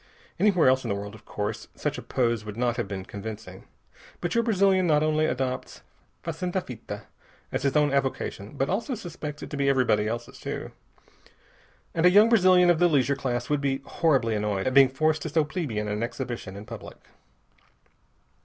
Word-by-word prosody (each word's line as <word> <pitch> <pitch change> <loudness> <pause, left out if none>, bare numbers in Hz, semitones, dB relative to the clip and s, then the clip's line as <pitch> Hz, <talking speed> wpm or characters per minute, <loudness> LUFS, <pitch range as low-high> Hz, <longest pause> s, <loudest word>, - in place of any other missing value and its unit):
Anywhere 195 -8 +4
else 130 0 +4
in - - -4
the 100 - 0
world, 100 +1 -6
of 110 - -14
course, 105 +2 -4
such 150 -1 -2
a - - -7
pose 120 -4 0
would 105 0 -8
not 120 -1 +1
have 120 - -2
been 95 -1 -5
convincing. 100 -2 -8 0.5
But 175 -1 -2
your 235 - +3
Brazilian 195 -4 +3
not 150 -1 +3
only 155 0 +2
adopts 130 -2 -3 0.4
fazenda 175 +3 -2
fita 115 -7 -8 0.5
as - - -1
his 135 0 0
own 150 -2 +3
avocation, 135 -3 -2
but 135 - +1
also 230 - -1
suspects 160 -7 -7
it - - -8
to 145 - -4
be 140 0 +2
everybody 125 -6 +2
else's 120 +2 -5
too. - - -5 1.2
And 165 +1 +4
a - - +8
young 205 +5 +6
Brazilian 185 -5 +6
of 165 - +1
the 175 - +5
leisure 140 -2 +2
class 125 -3 -2
would 145 -1 0
be 135 -1 0
horribly 135 -9 +1
annoyed 105 -2 -1
at 130 - 0
being 135 -1 +7
forced 155 +3 +1
to 160 - -4
so 155 0 +2
plebeian 140 - -3
an 105 +1 -2
exhibition 120 -5 -4
in 100 +1 -8
public. - - -9
135 Hz, 190 wpm, -26 LUFS, 115-160 Hz, 1.2 s, a